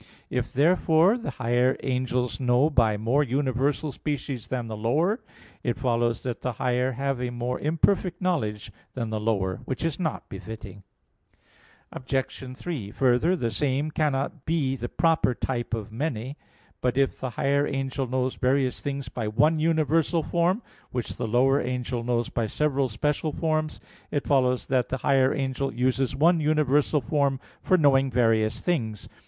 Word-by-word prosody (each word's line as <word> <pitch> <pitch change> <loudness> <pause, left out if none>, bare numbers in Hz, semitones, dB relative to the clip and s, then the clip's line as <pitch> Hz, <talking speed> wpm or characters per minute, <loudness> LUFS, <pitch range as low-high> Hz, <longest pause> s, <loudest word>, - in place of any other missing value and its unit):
If, - - -1
therefore, 165 - +4
the 240 -2 -4
higher 125 +1 +1
angels 125 -1 -1
know 130 +4 +3
by 115 -6 +3
more 115 +7 +2
universal 140 +2 0
species 135 -3 -4
than 125 -2 -2
the 110 - -5
lower, 155 - +1 0.4
it 120 - -1
follows 120 -2 0
that 125 -2 -4
the 125 - -2
higher 125 +2 0
have 135 0 -2
a 125 - -1
more 120 +1 -3
imperfect 175 +3 +1
knowledge 110 - -1 0.2
than 115 -3 -3
the 110 - -1
lower; 100 -4 0
which 130 +5 -3
is 165 0 -2
not 160 -4 -2
befitting. 100 0 -8 1.1
Obj. 130 -1 -3
3: 145 - -4
Further, 130 - +2
the 120 -9 -2
same 140 +5 0
cannot 145 -1 -1
be 150 -5 0
the 120 -2 -5
proper 160 -6 +2
type 120 -2 -3
of 110 -1 -6
many. 130 0 -3 0.5
But 125 0 0
if 135 -1 +1
the 130 - -3
higher 140 +1 +2
angel 135 -1 -2
knows 130 +1 0
various 130 0 +1
things 140 -1 -3
by 120 -3 -4
one 150 +9 +3
universal 160 +1 +2
form, 180 +8 +1 0.3
which 125 -2 -4
the - - -3
lower 130 +5 +3
angel 125 -1 -3
knows 120 0 0
by 115 -2 -1
several 140 +1 0
special 150 +7 -1
forms, 155 -1 -1 0.3
it 145 - -2
follows 125 -3 +2
that 130 -2 +1
the 130 - -1
higher 135 0 +3
angel 135 0 -1
uses 130 +2 0
one 165 +3 +4
universal 150 -1 +2
form 140 +2 +1 0.2
for 185 - +3
knowing 135 -4 +4
various 115 -2 +2
things. 115 - -2
130 Hz, 160 wpm, -26 LUFS, 120-150 Hz, 1.1 s, therefore